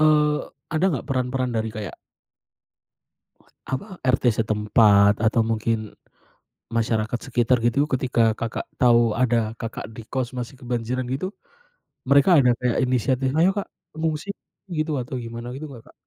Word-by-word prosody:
eee 150 -1 +3 0.2
ada 160 +3 +1
gak, - - -9
peran-peran 130 -1 -1
dari 110 0 -1
kayak 105 -3 -6 1.8
apa, 190 +9 -4
RT 130 0 +2 0.2
setempat 105 -1 +4
atau 115 +1 +3
mungkin 110 -1 -1 0.8
masyarakat 115 0 0
sekitar 120 0 +1
gitu, 140 +5 +1
ketika 125 -4 +2
Kakak, 115 - -3 0.2
tahu 120 -2 +5
ada 115 -2 +1
Kakak 115 -1 -6
di 110 0 -10
kos 130 -2 -2
masih 120 +2 -5
kebanjiran 125 0 -2
gitu, 185 +10 -3 0.7
mereka 140 +5 +6
ada 125 -3 +5
kayak 125 -2 0
inisiatif, 130 +2 0
"Ayo 170 +4 +4
Kak, 200 - -3 0.3
mengungsi," 160 +4 -2 0.4
gitu, 155 -1 -1
atau 125 +1 -5
gimana 115 0 -6
gitu 135 +5 -6
gak 115 - -12
Kak? - - -22
125 Hz, 140 wpm, -23 LUFS, 115-135 Hz, 1.8 s, mereka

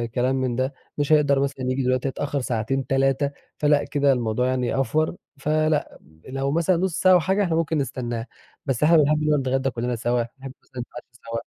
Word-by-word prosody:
كلام 125 +2 +1
من 130 -2 -1
ده، 130 +2 -1 0.2
مش 145 +1 -1
هيقدر 145 -2 +4
مثلًا 135 -1 -2
ييجي 130 +1 0
دلوقتي 130 +1 +1
هيتأخر 140 +1 -2
ساعتين 125 +2 -2
3، 135 +1 +1 0.3
فلأ 150 -1 +3
كده 140 -1 +2
الموضوع 120 0 0
يعني 130 +1 0
أڨور 155 +6 0 0.3
فلأ، 155 +1 0 0.3
لو 135 +1 -1
مثلًا 170 +3 +2
نص 180 -1 -1
ساعة 185 0 +6
أو 180 - +7
حاجة 190 +5 +1
إحنا 170 -4 0
ممكن 165 -1 0
نستناه. 120 -4 -3 0.4
بس 135 -2 -1
إحنا 165 +2 +6
بنحب 150 0 +3
إننا 150 -1 +3
نتغدا 135 0 0
كلّنا 120 0 -2
سوا، 120 +1 0 0.2
نحب 135 -1 -8
مثلًا 125 - -8
نتعشى 120 0 -10
سوا. 115 -1 -5
135 Hz, 195 wpm, -24 LUFS, 125-150 Hz, 0.4 s, أو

